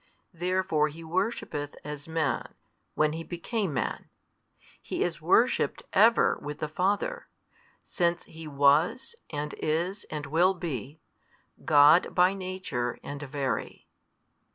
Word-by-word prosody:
Therefore 180 -3 +1
He 160 +2 -9
worshippeth 165 -4 -2
as 150 0 -7
Man, 160 -4 -2 0.4
when 155 0 +2
He 165 +1 -5
became 190 +3 -3
Man; 130 - -3 0.7
He - - -2
is - - -3
worshipped - - +2
ever - - +5
with 150 0 -6
the 155 - -3
Father, 200 - -1 0.6
since 170 -1 0
He 160 0 -11
was 150 - +2
and 150 -1 -4
is 175 +6 -1
and 150 -2 -5
will 175 +6 +3
be, 150 - -5 0.6
God 150 +3 +6
by 180 +1 +5
Nature 185 -11 -3
and 145 0 -6
Very. 135 -5 -3
160 Hz, 120 wpm, -28 LUFS, 145-185 Hz, 0.7 s, God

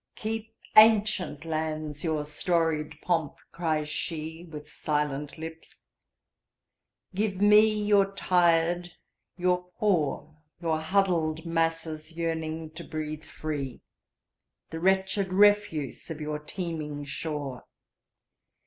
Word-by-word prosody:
"Keep, 225 0 -4 0.2
ancient 215 -8 +5
lands, 155 -2 -3
your 155 -3 0
storied 160 0 0
pomp!" 165 -5 0 0.2
cries 155 -3 -1
sheWith 160 0 -5
silent 150 -1 -2
lips. 160 0 -9 1.3
"Give 200 -1 -1
me 210 +2 +7 0.2
your 200 -1 +4
tired, 175 -1 +2 0.4
your 180 0 +1
poor, 155 -6 0 0.2
Your 165 -2 0
huddled 165 -2 +1
masses 165 -1 -1
yearning 160 -1 -2
to 165 +2 -8
breathe 155 -1 -5
free, 145 -5 -5 0.9
The 160 - -4
wretched 190 +1 +1
refuse 200 - +3
of 160 -2 -5
your 150 0 -3
teeming 150 -3 -5
shore. 140 -2 -5
165 Hz, 95 wpm, -28 LUFS, 155-180 Hz, 1.3 s, me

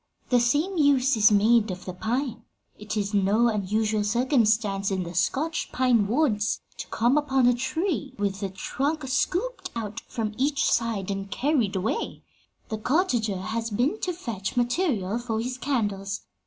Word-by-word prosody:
The 245 - +4
same 295 +11 +1
use 275 -3 +4
is 215 0 +5
made 220 +2 +4
of 185 0 -6
the 185 - -5
pine. 235 +4 -2 0.4
It 210 +1 -4
is 205 0 -1
no 205 +4 +3
unusual 215 +1 0
circumstance, 215 -4 +2
in 190 -2 -1
the 170 0 -7
Scotch 290 - -1
pine 245 -5 +3
woods, 225 -4 +1 0.2
to - - -5
come 245 +6 +2
upon 270 -3 +2
a 245 - +5
tree 285 +2 -2
with 200 -1 -1
the 195 - -2
trunk 275 +9 -2
scooped 385 - -1
out 220 -1 -4
from 220 -2 -3
each 285 +2 +1
side 225 -4 0
and 195 0 -4
carried 245 -5 0
away: 215 - -2 0.5
the 220 - -3
cottager 240 - +1
has 225 +3 -3
been 255 - 0
to 365 - -1
fetch 230 - -5
material 240 - 0
for 230 -2 -2
his 250 +2 -4
candles. 205 -8 -2
230 Hz, 160 wpm, -26 LUFS, 205-270 Hz, 0.5 s, is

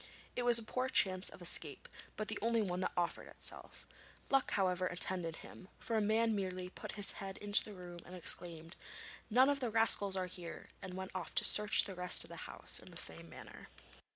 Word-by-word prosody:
It - - -2
was 240 -1 +6
a 230 - +2
poor 255 +4 -3
chance 185 -5 +3
of 180 - -12
escape, 160 -3 -1 0.3
but 215 - -3
the - - -3
only 230 0 +1
one 180 -2 -3
that 185 - -2
offered 175 -1 -2
itself. - - -3 0.5
Luck, 270 -1 +2
however, 185 -2 0
attended 180 -2 -2
him, 185 - -13
for 230 - -4
a 220 - +2
man 220 +1 +1
merely 185 -2 -4
put - - -8
his 205 -2 +2
head 195 -2 -7
into 205 0 +3
the 210 - -10
room 175 -1 -10
and 180 - -11
exclaimed, 170 -1 +2 0.5
'None 255 +4 +5
of 285 0 +1
the 250 -3 -2
rascals 215 -3 +3
are 185 - -1
here,' 180 -2 -8
and 185 -1 -7
went 190 0 -6
off 185 -2 -6
to - - +3
search 210 0 +4
the 195 - -7
rest 180 0 +5
of - - -14
the - - -8
house - - -2
in - - -14
the - - -11
same - - -2
manner. - - -12
190 Hz, 210 wpm, -35 LUFS, 180-220 Hz, 0.5 s, was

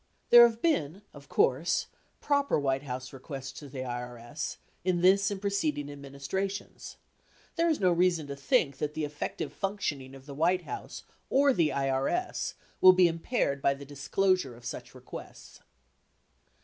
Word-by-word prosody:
There 240 0 +11
have 230 0 -7
been, 190 - 0
of 145 -1 -14
course, 150 +7 +2 0.4
proper 285 - +2
White 135 -1 0
House 130 -2 -6
requests 135 0 -7
to 145 -2 -10
the 130 0 -6
IRS 125 +3 -5 0.3
in 180 -1 +1
this 195 +2 +5
and 200 -2 -4
preceding 155 -8 -1
administrations. 140 +8 -5 0.6
There 335 0 +2
is 315 - +1
no 185 -2 +3
reason 175 -2 +2
to 140 0 -6
think 140 - +1
that 150 0 -2
the 155 -1 -1
effective 145 0 -5
functioning 150 -10 -3
of 135 0 -14
the 140 - -8
White 175 +5 +1
House 420 - -7 0.3
or 275 0 +4
the 165 -7 +2
IRS 135 - -1 0.3
will 185 0 +10
be 180 -1 +5
impaired 165 - -1
by 140 - +2
the 140 +1 -10
disclosure 145 +1 0
of 120 0 -15
such - - -7
requests. - - -11
150 Hz, 155 wpm, -29 LUFS, 140-195 Hz, 0.6 s, There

